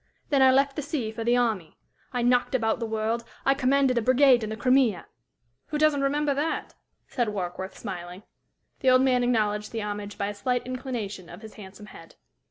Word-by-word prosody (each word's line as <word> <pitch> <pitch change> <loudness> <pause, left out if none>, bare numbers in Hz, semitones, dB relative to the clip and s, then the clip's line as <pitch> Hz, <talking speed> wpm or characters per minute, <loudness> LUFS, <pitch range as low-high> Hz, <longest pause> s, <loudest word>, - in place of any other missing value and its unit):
Then 280 -2 +3
I 265 - +7
left 275 +1 +2
the - - -2
sea 275 -6 -3
for 225 +1 -5
the 240 +2 +2
army. 220 -9 -1 0.3
I 245 -2 -1
knocked 245 +1 +2
about 225 -3 0
the 230 - -3
world. 220 +1 -1 0.2
I 270 - +5
commanded 270 -2 +2
a - - -2
brigade 255 0 +4
in 215 - -3
the 220 - -5
Crimea 250 -7 +2 0.3
" 120 +2 -48
"Who 300 - -3
doesn't 300 -2 +3
remember 285 +1 +1
that?" 295 +4 -2 0.3
said 240 -3 -1
Warkworth, 190 -1 -5
smiling. 180 0 -7 0.6
The 265 - +2
old 255 0 +5
man 250 -2 +2
acknowledged 210 -3 0
the 225 -2 -3
homage 205 0 -5
by 200 - -2
a - - -4
slight 245 +5 -2
inclination 245 -8 -5
of 180 +6 -11
his 220 - -10
handsome 200 0 -12
head. 165 -5 -14
235 Hz, 200 wpm, -26 LUFS, 210-265 Hz, 0.6 s, I